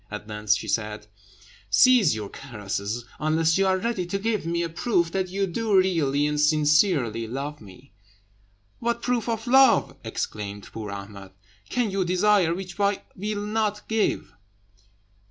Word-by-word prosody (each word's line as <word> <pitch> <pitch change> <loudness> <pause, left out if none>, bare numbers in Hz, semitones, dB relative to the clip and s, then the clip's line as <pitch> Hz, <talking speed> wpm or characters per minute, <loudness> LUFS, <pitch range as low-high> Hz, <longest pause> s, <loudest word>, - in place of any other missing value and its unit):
At 105 0 -7
length 105 -1 +1
she - - -5
said 105 -1 -2 0.6
"Cease 215 - +5
your 105 -2 -5
caresses, 105 -2 -5
unless 160 +3 +2
you 195 - +3
are 190 0 +3
ready 225 -2 -2
to 195 - -2
give 210 -3 -2
me 170 0 0
a - - -1
proof 170 0 0
that 190 0 -1
you 195 +2 0
do 205 +2 0
really 155 -7 +2
and 150 0 0
sincerely 150 - +2
love 140 +5 -5
me." 115 +7 -15 0.9
"What 235 0 -2
proof 245 -2 0
of 225 0 -2
love," 265 +2 +5
exclaimed 100 -1 -5
poor 110 -2 -6
Ahmed, 100 -1 -9 0.4
"can 240 -4 0
you 195 0 0
desire 185 -1 +3
which 185 0 -8
I 200 0 +1
will 205 +1 -3
not 210 -1 -1
give?" 220 -1 -1
170 Hz, 155 wpm, -25 LUFS, -, 0.9 s, Cease